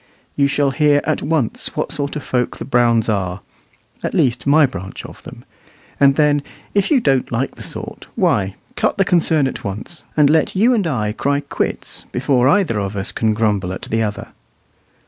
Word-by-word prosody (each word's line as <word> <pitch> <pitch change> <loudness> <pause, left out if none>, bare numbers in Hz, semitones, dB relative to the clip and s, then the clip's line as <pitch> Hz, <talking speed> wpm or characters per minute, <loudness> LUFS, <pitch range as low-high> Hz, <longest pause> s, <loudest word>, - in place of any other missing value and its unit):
You 140 -1 +3
shall 140 0 +1
hear 150 0 +3
at - - -1
once 150 -6 -1
what - - -2
sort 145 0 -2
of 150 - -4
folk 125 -1 -1
the - - -6
Browns 120 -3 +2
are 95 -4 -1 0.6
at - - -3
least 120 -1 +1
my 150 +1 +6
branch 95 -7 -7
of - - -11
them; - - -12 0.5
and 140 -1 +5
then, 150 -1 +3 0.3
if 200 -1 +2
you 290 - +4
don't 135 - +1
like 125 +3 -1
the - - -13
sort, - - -7
why, 95 -1 +1 0.2
cut - - 0
the - - +3
concern 160 -4 +3
at - - -6
once, 105 - -6 0.2
and 150 -1 +6
let 155 +5 +2
you 230 +7 +4
and 205 -7 +1
I 110 -8 -1
cry 140 +6 0
quits 140 - -4
before 130 0 +2
either 145 - +2
of 100 0 -3
us 95 - -3
can 110 -1 0
grumble 105 -5 0
at 95 - -6
the 115 0 -1
other. 105 -2 -3
135 Hz, 190 wpm, -19 LUFS, 110-150 Hz, 0.6 s, my